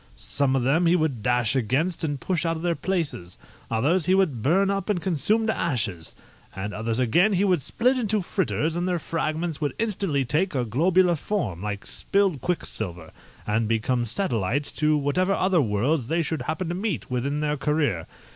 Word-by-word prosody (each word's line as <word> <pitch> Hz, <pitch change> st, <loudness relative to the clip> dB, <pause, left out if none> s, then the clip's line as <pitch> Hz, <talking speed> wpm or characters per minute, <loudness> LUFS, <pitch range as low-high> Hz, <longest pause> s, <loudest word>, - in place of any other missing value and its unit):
Some 110 Hz, +7 st, 0 dB
of 130 Hz, -, +1 dB
them 160 Hz, +7 st, +3 dB
he 170 Hz, -, +4 dB
would 155 Hz, -9 st, 0 dB
dash 120 Hz, 0 st, +1 dB
against 135 Hz, -, 0 dB
and 145 Hz, -3 st, -2 dB
push 180 Hz, +2 st, -1 dB
out 165 Hz, -1 st, 0 dB
of 160 Hz, -, -8 dB
their 175 Hz, -1 st, +2 dB
places; 160 Hz, -, -3 dB, 0.3 s
others 145 Hz, +10 st, +1 dB
he 185 Hz, -, +4 dB
would 160 Hz, -, +1 dB
burn 190 Hz, -, +3 dB
up 195 Hz, -1 st, -2 dB
and 200 Hz, -4 st, +1 dB
consume 190 Hz, -, +1 dB
to 220 Hz, -, 0 dB
ashes: 100 Hz, -, -1 dB, 0.4 s
and 100 Hz, +2 st, -4 dB
others 110 Hz, +1 st, -2 dB
again 170 Hz, -, +3 dB
he 190 Hz, +1 st, +2 dB
would 180 Hz, -6 st, +2 dB
split 250 Hz, -, +1 dB
into 215 Hz, -3 st, +1 dB
fritters, 165 Hz, -4 st, -1 dB
and 175 Hz, +1 st, -1 dB
their 180 Hz, -1 st, +1 dB
fragments 160 Hz, 0 st, -2 dB
would 145 Hz, -, -1 dB
instantly 195 Hz, -11 st, 0 dB
take 155 Hz, +7 st, 0 dB
a 125 Hz, -2 st, 0 dB
globular 175 Hz, -, +3 dB
form, 145 Hz, -, -3 dB
like 100 Hz, -1 st, -4 dB
spilled 195 Hz, -9 st, 0 dB
quicksilver, 90 Hz, -, -3 dB, 0.3 s
and 110 Hz, +1 st, 0 dB
become 115 Hz, +2 st, 0 dB
satellites 120 Hz, -, -1 dB
to 155 Hz, 0 st, +2 dB
whatever 180 Hz, +7 st, +1 dB
other 185 Hz, -3 st, +2 dB
worlds 120 Hz, +4 st, 0 dB
they 165 Hz, +3 st, +1 dB
should 160 Hz, 0 st, -3 dB
happen 170 Hz, +2 st, -3 dB
to -, -, -1 dB
meet 190 Hz, -, -3 dB
with 125 Hz, -1 st, 0 dB
in 140 Hz, +2 st, -1 dB
their 150 Hz, 0 st, 0 dB
career. 145 Hz, -, 0 dB
155 Hz, 190 wpm, -25 LUFS, 120-180 Hz, 0.4 s, he